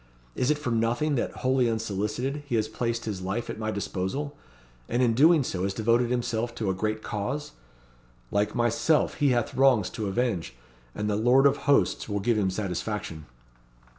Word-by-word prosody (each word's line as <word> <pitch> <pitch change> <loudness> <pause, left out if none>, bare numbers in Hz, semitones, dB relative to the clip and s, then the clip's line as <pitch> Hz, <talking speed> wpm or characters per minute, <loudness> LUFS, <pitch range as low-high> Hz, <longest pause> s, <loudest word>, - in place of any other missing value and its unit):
Is 125 - 0
it 150 - +3
for 140 -5 -3
nothing 115 +6 +1
that, 125 - 0
wholly 130 -2 +1
unsolicited, 110 +5 -2
he 120 - -1
has 110 -1 +1
placed 115 +1 -3
his 100 -4 -4
life 95 +6 -3
at - - -8
my 110 0 -2
disposal, 105 +8 -3 0.5
and 120 +2 +1
in 115 -2 +3
doing 155 +5 +5
so 95 -7 -3
has 95 +1 -1
devoted 115 +3 +2
himself 120 -1 -1
to 105 -5 -1
a - - -1
great 110 +3 -2
cause? 120 +8 -3 0.8
Like 105 +1 0
myself 120 +6 +2
he 145 -2 +4
hath 120 -3 0
wrongs 130 -7 +3
to 105 - -4
avenge, 95 - -1 0.4
and 105 - -2
the 105 - +1
Lord 125 +6 +4
of 140 - +4
Hosts 140 - +2
will 100 0 -1
give 115 +4 +1
him 100 -3 +1
satisfaction." 95 -4 -4
115 Hz, 180 wpm, -27 LUFS, 105-125 Hz, 0.8 s, doing